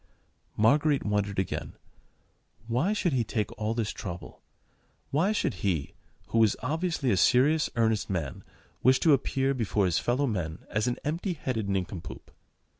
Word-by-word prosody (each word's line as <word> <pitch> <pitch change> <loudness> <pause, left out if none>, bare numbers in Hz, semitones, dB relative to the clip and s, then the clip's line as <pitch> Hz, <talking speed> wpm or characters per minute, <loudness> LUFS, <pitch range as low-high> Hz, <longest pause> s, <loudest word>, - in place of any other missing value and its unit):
Marguerite 145 +6 +3
wondered 105 -1 0
again. 95 -2 -2 0.9
Why 125 - +1
should 190 -6 0
he 125 -3 +2
take 105 -2 -2
all 110 +1 -2
this 115 -3 -1
trouble? 90 -3 -8 0.7
Why 165 +9 +2
should 210 - 0
he—who 95 +5 -3
was 110 -3 +4
obviously 160 -2 0
a 95 - +2
serious, 140 - +4
earnest 110 -2 +1
man—wish 95 - -1
to 160 - +5
appear 135 0 +1
before 110 -5 0
his 90 -2 +2
fellow 125 +4 +1
men 90 - -3
as 105 +3 0
an 120 - 0
empty 170 +5 -2
headed 115 -9 -3
nincompoop? 95 -2 -4
115 Hz, 140 wpm, -28 LUFS, 100-140 Hz, 0.9 s, to